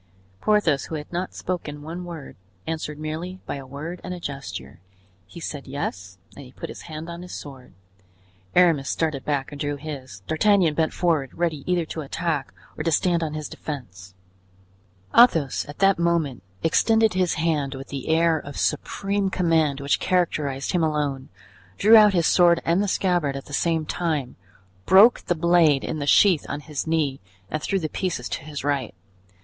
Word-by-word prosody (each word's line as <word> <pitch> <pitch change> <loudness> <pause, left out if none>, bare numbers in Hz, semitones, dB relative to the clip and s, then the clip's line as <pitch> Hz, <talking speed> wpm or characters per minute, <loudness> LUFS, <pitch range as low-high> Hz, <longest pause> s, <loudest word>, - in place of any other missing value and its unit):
Porthos, 190 -10 +2
who 160 - -5
had 150 +2 -7
not 180 +2 -3
spoken 150 -5 -4
one 170 +3 -6
word, 165 -5 -8 0.3
answered 155 -2 -4
merely 160 +5 -5
by - - -4
a 135 -1 -9
word 155 +6 -7
and 180 0 -5
a - - -8
gesture. 95 - -7 0.5
He 170 - -11
said 145 -4 -6
"yes" 95 -9 -5 0.2
and 140 - -10
he 125 - -13
put - - -8
his - - -9
hand 155 +1 -6
on 170 0 -7
his 180 - -8
sword. 135 -6 -10 0.8
Aramis 165 -6 +4
started 155 -5 -1
back 145 0 -2
and 145 0 -8
drew 145 -1 -1
his. 135 -9 -8
D'Artagnan 170 - +3
bent 160 +1 +1
forward, 160 -7 0
ready 165 -5 -1
either 175 -2 +1
to 160 - -5
attack 155 -1 -2 0.2
or - - -4
to 165 - +1
stand 170 +2 +2
on 155 -2 -3
his 155 -1 -4
defense. 95 - -8 1.0
Athos 165 - +4
at 145 - -9
that 195 -2 +3
moment 170 -6 0 0.2
extended 220 +6 +3
his 185 -2 +1
hand 150 -4 0
with 135 +1 -9
the 135 -2 -6
air 165 0 +3
of 145 -1 -9
supreme 200 0 -1
command 160 -6 +1
which 140 0 +1
characterized 150 -7 0
him 175 -3 +1
alone, 145 -4 -1 0.5
drew 220 +2 +7
out 210 -2 +8
his 170 -2 +2
sword 170 -1 +5
and 170 +4 +2
the 205 - 0
scabbard 175 -7 +1
at 135 - -6
the 145 - -11
same 160 +1 +1
time, 150 -7 -2 0.5
broke 200 +6 +7
the 175 - +2
blade 165 -4 +4
in 155 - -3
the 145 - -3
sheath 180 0 +5
on 145 - -4
his 150 0 -5
knee 150 -4 0 0.3
and 155 - -2
threw 195 - 0
the 165 -4 -2
pieces 155 -7 -3
to - - -4
his 150 -2 -6
right. 140 -4 -1
155 Hz, 180 wpm, -24 LUFS, 140-175 Hz, 1.0 s, out